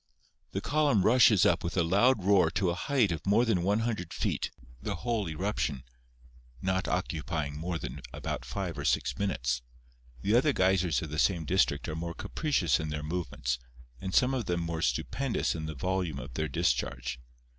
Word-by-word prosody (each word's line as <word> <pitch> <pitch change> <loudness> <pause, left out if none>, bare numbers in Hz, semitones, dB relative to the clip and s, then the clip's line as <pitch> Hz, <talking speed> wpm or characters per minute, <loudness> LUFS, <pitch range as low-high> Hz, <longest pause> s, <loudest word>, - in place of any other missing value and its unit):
The - - -1
column 145 -8 +2
rushes 115 -4 +6
up - - +3
with 85 +2 -3
a 90 - +4
loud 100 +6 +3
roar 95 -4 +5
to 90 +2 0
a - - -1
height 120 - +1
of 80 -1 -3
more 105 +5 +3
than 105 -7 +2
100 105 -2 0
feet, - - -1 0.3
the 100 - -3
whole 110 -1 -1
eruption 80 -5 -2 0.8
not 95 +4 0
occupying 75 -2 -2
more 85 +3 -3
than 70 -3 -6
about - - -4
five 60 +1 -4
or - - -3
six - - +1
minutes. 65 -11 0 0.6
The 105 - +2
other 140 +4 +4
geysers 95 -5 +2
of 80 - -6
the 75 - -2
same 85 -3 +2
district 85 -4 +1
are 80 - -3
more 85 +1 -4
capricious 135 - 0
in 80 -1 -3
their 75 0 -4
movements, 65 -7 -2 0.4
and 95 - -4
some 125 +6 +3
of 125 -4 -1
them 85 -1 -1
more 85 -1 -3
stupendous 135 +6 0
in 80 -1 -4
the 80 - -5
volume 90 -1 -1
of 65 -1 -8
their 80 +4 -1
discharge. 65 -2 -1
90 Hz, 180 wpm, -30 LUFS, 80-105 Hz, 0.8 s, rushes